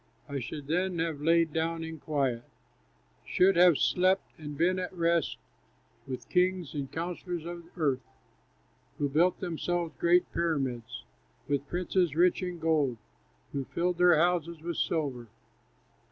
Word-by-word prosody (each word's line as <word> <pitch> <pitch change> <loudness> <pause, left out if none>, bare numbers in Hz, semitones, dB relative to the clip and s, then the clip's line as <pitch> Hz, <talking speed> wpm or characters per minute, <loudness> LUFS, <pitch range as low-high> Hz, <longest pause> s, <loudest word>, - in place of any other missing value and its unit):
I 140 -1 -3
should 140 +3 -6
then 180 +4 0
have 160 -3 -2
lain 165 +1 +3
down 165 0 -1
in 160 -1 -7
quiet, 135 -6 -1 0.8
Should 190 +2 +3
have 175 -3 +6
slept 185 +6 +2
and 150 -2 -7
been 185 +3 +2
at 180 - -3
rest 170 -2 +1 0.7
With 130 -1 -6
kings 180 -3 +1
and 140 -3 -4
counsellors 175 0 -4
of 170 0 -7
earth, 140 -6 +1 1.0
Who 145 - +1
built 170 +6 +3
themselves 175 -1 -2
great 175 +1 +3
pyramids; 130 -8 -2 0.4
With 145 0 -1
princes 175 -2 0
rich 175 +3 +3
in 180 -1 -3
gold, 155 -6 +1 0.5
Who 140 -1 -3
filled 175 +3 -1
their 180 -2 +6
houses 170 0 +1
with 170 0 -3
silver. 135 -8 -1
165 Hz, 140 wpm, -29 LUFS, 145-175 Hz, 1.0 s, have